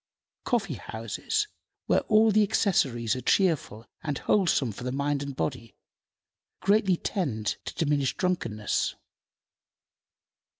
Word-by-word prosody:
Coffee 220 - 0
houses, 115 - -2 0.4
where - - +3
all 220 0 +6
the 215 +1 +4
accessories 135 - +2
are 130 - -4
cheerful 140 - +1 0.2
and 150 -3 -2
wholesome 170 - +2
for 125 +5 -5
mind 140 +1 -1
and 140 -1 -5
body, 125 -5 -3 0.8
greatly 195 -2 +3
tend 120 - -2
to - - -6
diminish 145 -4 0
drunkenness. 115 - -1
145 Hz, 110 wpm, -27 LUFS, 120-195 Hz, 0.8 s, all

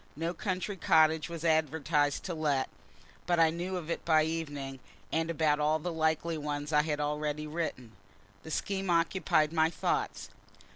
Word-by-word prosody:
No 165 +3 -2
country 185 +2 -3
cottage 160 -1 +3
was 170 -1 -6
advertised 150 -2 +1
to 180 - -3
let 150 -4 0 0.6
but 175 -1 +2
I 165 -1 +5
knew 180 +3 -3
of 170 -2 -5
it - - -3
by 155 -2 +4
evening, 145 -4 -4 0.3
and 165 +1 0
about 155 -2 +2
all 150 +1 +2
the 170 +2 -4
likely 160 0 0
ones 145 0 -3
I 150 - +6
had 150 -1 -2
already 150 0 -2
written. 150 -7 -4 0.5
The - - -10
scheme 195 +3 -2
occupied 165 -2 +2
my 160 -1 +3
thoughts. 165 - -2
160 Hz, 160 wpm, -31 LUFS, 150-170 Hz, 0.6 s, I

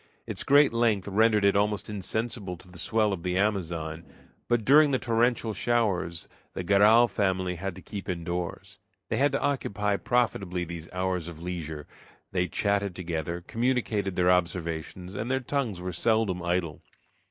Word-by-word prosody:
Its - - -3
great 145 -2 +5
length 115 -5 +1
rendered 105 +1 +3
it 100 - +4
almost 105 0 +1
insensible 105 -1 -3
to 90 - -16
the 90 -1 -12
swell 110 +2 +1
of 90 - -5
the 90 +1 -1
Amazon, 85 -6 -1 0.4
but 120 -3 +1
during 150 +2 +7
the 135 - +2
torrential 120 -1 +1
showers 100 -9 0 0.3
the - - -3
Garral 105 +5 +6
family 95 -3 0
had 95 +1 -5
to 95 - -11
keep 100 -3 -7
indoors. 85 0 -4 0.3
They - - 0
had 140 +1 +3
to 135 - +1
occupy 105 -7 0
profitably 100 -8 0
these 85 0 -7
hours 90 -2 -2
of 85 -1 -9
leisure. 80 -4 -5 0.5
They 90 -1 0
chatted 100 +1 0
together, 85 -1 -3
communicated 115 -5 0
their 90 0 +4
observations, 90 0 -2
and 110 +4 -4
their 130 0 +1
tongues 125 -7 -2
were 90 0 -4
seldom 110 -1 +1
idle. 85 -3 -1
95 Hz, 160 wpm, -27 LUFS, 90-115 Hz, 0.5 s, during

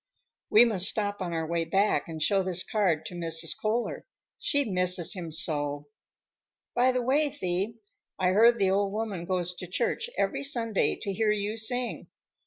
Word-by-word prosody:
"We 225 +3 +7
must 195 -5 +4
stop 205 -2 -2
on 180 -2 -3
our 165 -1 -2
way 170 +1 -1
back 190 -1 +1
and 160 -1 -7
show 195 +5 +2
this 185 -1 +1
card 180 -8 0
to 180 - -7
Mrs. 165 -1 0
Kohler. 225 +3 -2 0.3
She 285 -2 +1
misses 180 -4 +2
him 175 -4 -6
so." 145 -4 -3 0.8
"By 250 +1 +3
the 250 -1 -1
way, 290 +4 +2
Thee, 200 -5 -3 0.4
I 185 -1 +1
hear 220 +5 +6
the 195 -5 0
old 200 0 0
woman 210 -5 -4
goes 180 -1 -2
to 180 0 -8
church 470 - -2
every - - 0
Sunday 235 -7 0
to 200 -3 -5
hear 215 +2 0
you 210 0 -1
sing. 245 +2 0
195 Hz, 175 wpm, -27 LUFS, 175-225 Hz, 0.8 s, We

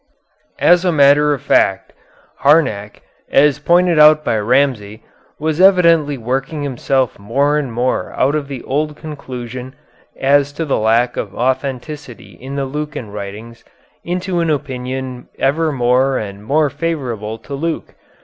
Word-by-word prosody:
As 175 +1 +4
a 180 - +2
matter 145 0 +4
of 145 - -2
fact, - - +1 0.5
Harnack, 110 -9 +1 0.3
as 145 0 +3
pointed 175 +1 +3
out 155 0 +7
by - - +1
Ramsay, 110 -2 0 0.3
was 155 +2 -1
evidently 170 -6 +4
working 135 +5 -3
himself 130 -2 -1
more 140 +8 +1
and 145 -5 -2
more 120 +3 -1
out 135 +3 +1
of 150 -2 -2
the 135 -3 -7
old 150 +2 -2
conclusion 130 -4 -8 0.4
as 140 +1 +3
to 165 +3 -3
the 140 - 0
lack 115 +3 +1
of 100 -2 -5
authenticity 130 - -4
of 135 +1 -6
the 140 -1 -1
Lucan 145 -5 -5
writings 105 +3 -8 0.4
into 180 0 -2
an 165 -1 0
opinion 130 -3 -4
ever 155 +3 +1
more 130 0 +2
and 100 -1 -6
more 145 +3 +1
favorable 130 -9 -4
to 115 +5 -10
Luke. 160 +3 -4
135 Hz, 140 wpm, -17 LUFS, 120-150 Hz, 0.5 s, out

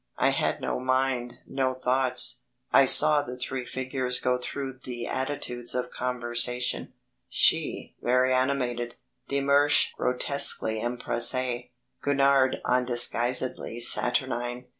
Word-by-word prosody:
I - - +2
had - - -2
no - - -3
mind, 130 -1 -2
no 130 -1 -2
thoughts. 130 0 0 0.3
I 135 - +6
saw 150 +3 +8
the 125 -3 -8
three 125 0 -5
figures 130 -1 -3
go 125 0 -1
through 135 +1 -7
the 120 -2 -7
attitudes 130 -3 -4
of 125 - -3
conversation 125 0 -2 0.4
she - - +1
very 125 +1 +1
animated, 125 -2 -2 0.3
de 140 0 -2
Mersch 140 +1 +3
grotesquely 125 -4 +1
empressé, 125 +1 -1 0.3
Gurnard 140 -2 +1
undisguisedly 125 -1 +1
saturnine. 125 0 +2
125 Hz, 110 wpm, -25 LUFS, 120-130 Hz, 0.4 s, saw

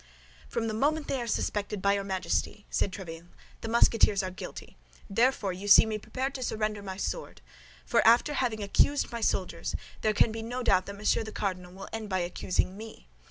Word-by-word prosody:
"From 225 -1 -1
the 220 - -2
moment 295 +7 +1
they 265 - -1
are 235 - -4
suspected 210 -2 -1
by 200 +1 +3
your 200 0 -1
Majesty," 195 +2 -2
said 195 - +1
Tréville, 170 -3 -8 0.3
"the - - -5
Musketeers 225 -3 +4
are 185 - -3
guilty; 185 - -9 0.3
therefore, 225 -3 +2
you 190 +3 -7
see 205 - +9
me 215 -1 -3
prepared 265 +5 -3
to 265 - -6
surrender 215 -3 -1
my 190 -1 -6
sword—for 235 - -3
after 235 +6 +5
having 235 -6 -1
accused 280 +9 +2
my 235 -1 -4
soldiers, - - -1 0.3
there 215 - +2
can 220 - +4
be 225 +1 -5
no 245 +3 -4
doubt 185 -5 +3
that 200 - -6
Monsieur 210 +2 +1
the 215 - -7
Cardinal 180 -4 -3
will 195 +1 -9
end 220 -2 -4
by 190 - 0
accusing 180 +1 -1
me. 215 - -11
215 Hz, 195 wpm, -29 LUFS, 195-235 Hz, 0.3 s, see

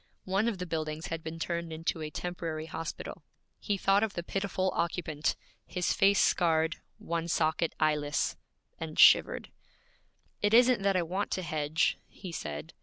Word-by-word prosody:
One 195 +4 +1
of 225 -4 -1
the 180 - -4
buildings 155 -2 -3
had 165 -1 -4
been 160 +1 -6
turned 170 0 -3
into 160 0 -2
a 155 - -3
temporary 165 -2 -4
hospital. 160 0 -6 0.4
He 205 -2 -1
thought 195 +1 +3
of 220 -2 0
the 175 - -3
pitiful 190 0 -1
occupant 160 -3 -1 0.3
his 180 -1 -1
face 195 0 +4
scarred, 160 -2 +2 0.2
one 170 0 -3
socket 160 0 +1
eyeless 150 -1 +1 0.4
and - - -6
shivered. - - +6 0.9
'It 205 +2 +4
isn't 245 -2 +6
that 195 0 +2
I 180 - +2
want 190 +5 -2
to 185 - -2
hedge,' 155 -1 0
he 185 -3 -9
said. 75 - -6
170 Hz, 160 wpm, -30 LUFS, 160-190 Hz, 0.9 s, shivered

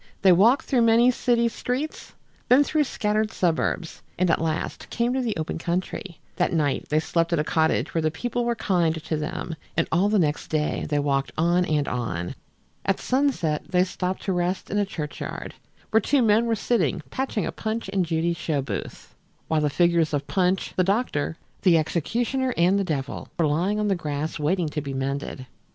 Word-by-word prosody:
They 190 - +7
walked 220 +10 +5
through 255 -3 +2
many 230 +2 +5
city 240 -1 +2
streets, 250 +6 -4 0.3
then 260 +4 +7
through 310 +2 -1
more - - +6
scattered 215 -3 0
suburbs, 175 -2 -1 0.2
and 180 -1 +2
at 160 - +1
last 160 -1 -3
came 240 +1 0
to 260 - 0
the 230 -6 -2
open 160 +1 -3
country. 175 +1 -3 0.2
That - - +1
night 150 -4 0
they 155 - +3
slept 165 +1 0
at - - +3
a 150 - +1
cottage 160 +1 +1
where 165 - +1
the 155 - +2
people 240 +9 -2
were 235 0 0
kind 175 -7 +1
to 160 0 -3
them, 155 +2 -4 0.2
and 165 - +2
all 185 +5 +3
the 215 - +3
next 150 -5 0
day 155 -1 -1
they 150 - +1
walked 140 -1 0
on 175 +3 +3
and 150 -3 0
on. 90 -9 -3 0.5
At 195 - 0
sunset 250 - 0
they 180 0 +3
stopped 185 0 -3
to 195 - 0
rest 180 +1 -1
in 205 - +1
a 205 - +1
churchyard, 150 -6 -5 0.4
where 220 - +4
two 270 +5 +2
men 225 +1 +4
were 230 - +2
sitting 195 - 0
patching 260 -5 -1
a - - -2
Punch 220 0 -3
and 190 -2 +2
Judy 165 0 0
show 160 -4 -2
booth, 135 - -6 0.4
while 160 -1 +2
the 150 - +2
figures 170 0 +2
of 145 - -2
Punch, 185 -1 0
the 185 - +3
doctor, 190 -6 0 0.2
the 175 -4 +5
executioner 235 - -1
and 180 +4 +4
the - - +1
devil 140 -6 -3
were 165 - +3
lying 175 +8 +1
on 210 - +1
the 200 - +3
grass 155 -2 -3
waiting 165 +3 +1
to 150 0 -3
be 135 -1 -5
mended. 135 0 -3
175 Hz, 200 wpm, -25 LUFS, 155-215 Hz, 0.5 s, They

